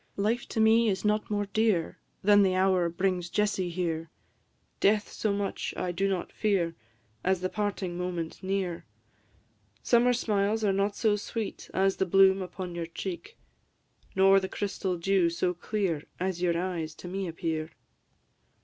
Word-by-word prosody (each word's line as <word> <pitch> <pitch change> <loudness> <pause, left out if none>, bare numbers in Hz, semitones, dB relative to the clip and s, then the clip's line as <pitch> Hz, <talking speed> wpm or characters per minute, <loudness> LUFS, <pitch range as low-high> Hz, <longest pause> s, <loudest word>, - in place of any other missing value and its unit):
Life 215 +4 0
to - - -3
me 220 +1 +5
is 195 +1 -2
not 210 +2 +1
more 205 -1 0
dear 205 -4 0 0.2
Than 205 +1 +6
the 190 -2 +3
hour 185 -2 +3
brings 180 0 -1
Jessie 200 -2 0
here; 165 -2 -2 0.7
Death 210 +1 +2
so 215 - -1
much 200 0 -3
I 180 - -1
do 195 +3 0
not 185 -3 -2
fear 190 -6 0 0.5
As 185 -1 +1
the 185 - -1
parting 195 -4 -3
moment 175 -2 -4
near. 190 -3 -2 1.0
Summer 245 +1 +4
smiles 215 -2 0
are 200 -2 +3
not 200 +1 0
so 215 -2 +2
sweet 215 +1 -5
As 195 0 +1
the 190 - 0
bloom 195 +1 +5
upon 180 0 -6
your 170 -1 -4
cheek; 190 - -6 0.8
Nor 195 +1 +6
the 190 0 -4
crystal 195 -3 -2
dew 185 0 +2
so 180 +2 0
clear 175 -4 -2
As 185 -1 -2
your 170 -2 +2
eyes 170 -3 -3
to - - -10
me 190 +1 -3
appear. 160 -1 -3
190 Hz, 160 wpm, -28 LUFS, 175-205 Hz, 1.0 s, Than